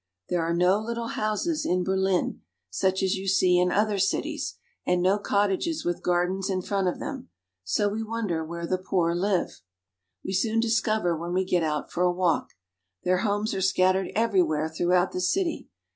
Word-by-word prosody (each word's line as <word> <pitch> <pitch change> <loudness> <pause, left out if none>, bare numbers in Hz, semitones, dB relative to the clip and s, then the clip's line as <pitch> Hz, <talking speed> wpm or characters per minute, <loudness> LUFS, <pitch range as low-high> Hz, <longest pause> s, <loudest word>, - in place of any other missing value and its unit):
There 175 -1 +1
are 165 +1 0
no 180 +3 +3
little 230 +1 -4
houses 215 +10 -1
in 180 0 +1
Berlin, 190 0 0 0.3
such 190 - 0
as 190 - +2
you 195 +1 -6
see 185 -2 +4
in 180 0 +2
other 210 0 +1
cities, 195 - -1 0.3
and 180 0 +1
no 190 +3 +2
cottages 205 - 0
with 175 0 -1
gardens 180 +2 0
in 185 -1 -1
front 195 -1 0
of 180 - -1
them, 270 -3 -6 0.3
so 100 - +1
we 210 +2 -2
wonder 215 -7 -2
where 170 +1 -5
the 185 +2 -1
poor 180 -2 0
live. 180 - -1 0.6
We - - -3
soon 220 +4 +1
discover 220 -5 +1
when 170 +2 -4
we 185 +1 +1
get 180 -1 +1
out 150 -2 -2
for 175 - -2
a 180 0 +4
walk. 175 -3 0 0.5
Their 180 0 +2
homes 205 +1 0
are 190 - -2
scattered 185 0 +2
everywhere 180 -9 +2
throughout 175 +3 +1
the 180 - -3
city. 335 - -1
190 Hz, 180 wpm, -26 LUFS, 175-205 Hz, 0.6 s, see